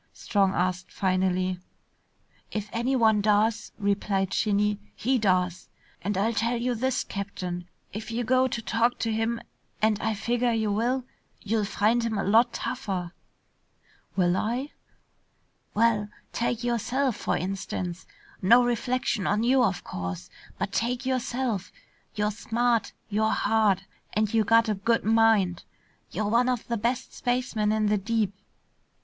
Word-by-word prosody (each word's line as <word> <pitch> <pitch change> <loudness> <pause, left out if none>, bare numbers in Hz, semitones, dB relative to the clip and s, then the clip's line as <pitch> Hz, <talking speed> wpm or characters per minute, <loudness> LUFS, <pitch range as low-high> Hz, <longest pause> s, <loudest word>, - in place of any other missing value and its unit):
Strong 195 -3 +1
asked 180 +1 -1
finally. 185 -1 0 0.9
"If 210 -1 -4
anyone 230 -3 +3
does," 215 +2 +2
replied 200 -1 0
Shinny, 210 -1 +1 0.2
"he 255 +2 +1
does. 185 -3 +1 0.3
And 200 +2 -2
I'll 220 +4 +1
tell 230 +2 0
you 245 +1 0
this, 255 +2 0
Captain, 180 -3 -5 0.2
if 215 +3 -6
you 235 +1 -1
go 255 +2 +3
to 235 -2 -4
talk 230 +3 +1
to 225 - -1
him 225 +1 0 0.4
and 215 -1 +2
I 220 -1 0
figger 240 +3 0
you 220 -2 0
will, 245 +5 0 0.4
you'll 215 0 0
find 220 +3 +2
him 230 -2 -1
a 195 - 0
lot 230 +4 +4
tougher." 195 -11 -3 1.0
"Will 180 -2 +3
I?" 245 +8 -1 1.0
"Well, 215 -2 +2 0.2
take 235 0 -1
yourself, 240 +2 0
for - - -1
instance. 185 -1 -4 0.3
No 235 +6 +6
reflection 240 -2 0
on 210 +2 +1
you, 255 +1 +4
of 190 -6 0
course, 90 -1 -5 0.3
but - - -2
take 245 +3 -1
yourself. 250 -5 -1 0.4
You're 210 0 +1
smart, 230 +2 0 0.2
you're 220 +2 +2
hard, 215 -4 +2 0.3
and 215 0 0
you 220 -2 +3
got 230 +2 +5
a 215 - +2
good 230 +4 +1
mind. 220 -5 +3 0.5
You're 215 +3 -2
one 240 +4 +3
of 250 -3 -2
the 235 - -1
best 240 +4 -2
spacemen 245 -4 0
in 215 0 +1
the 210 0 +2
deep. 215 -1 0
220 Hz, 145 wpm, -27 LUFS, 200-235 Hz, 1.0 s, No